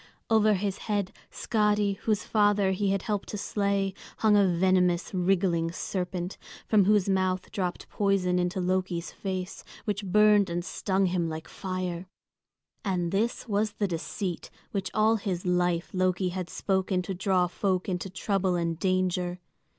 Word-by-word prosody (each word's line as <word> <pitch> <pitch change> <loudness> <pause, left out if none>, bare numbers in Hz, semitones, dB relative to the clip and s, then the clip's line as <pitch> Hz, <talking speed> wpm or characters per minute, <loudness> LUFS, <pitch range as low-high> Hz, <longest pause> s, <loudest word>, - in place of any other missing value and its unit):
Over 215 -1 +5
his 195 0 -2
head 205 -3 0 0.2
Skadi, 210 -2 +1
whose 210 0 0
father 205 -2 +3
he 195 +1 0
had 195 -1 0
helped 205 -2 -2
to 210 - -4
slay, 200 -1 0 0.2
hung 215 -1 +4
a 200 -1 +5
venomous, 180 0 +2
wriggling 175 -2 +1
serpent, 180 +1 -4 0.3
from 210 -3 +4
whose 205 -1 +3
mouth 185 -1 0
dropped 180 -3 -3
poison 190 -3 +1
into 180 +1 -1
Loki's 180 -1 -1
face, 185 -1 -5 0.2
which 210 -1 -2
burned 210 0 +5
and 170 +1 -2
stung 195 0 0
him 175 -2 0
like 160 0 -6
fire. 185 -1 -4 0.8
And 180 -4 -1
this 225 +5 -1
was 210 0 0
the 205 -1 -1
deceit 175 +1 -4 0.2
which 195 -2 -2
all 220 +1 +4
his 190 -4 -3
life 180 -1 +1
Loki 185 0 +1
had 180 -1 -4
spoken 190 -1 0
to 195 - -4
draw 185 -1 +2
folk 185 +1 -1
into 185 0 -2
trouble 190 0 0
and 170 -1 -1
danger. 185 -1 0
190 Hz, 150 wpm, -28 LUFS, 180-200 Hz, 0.8 s, Over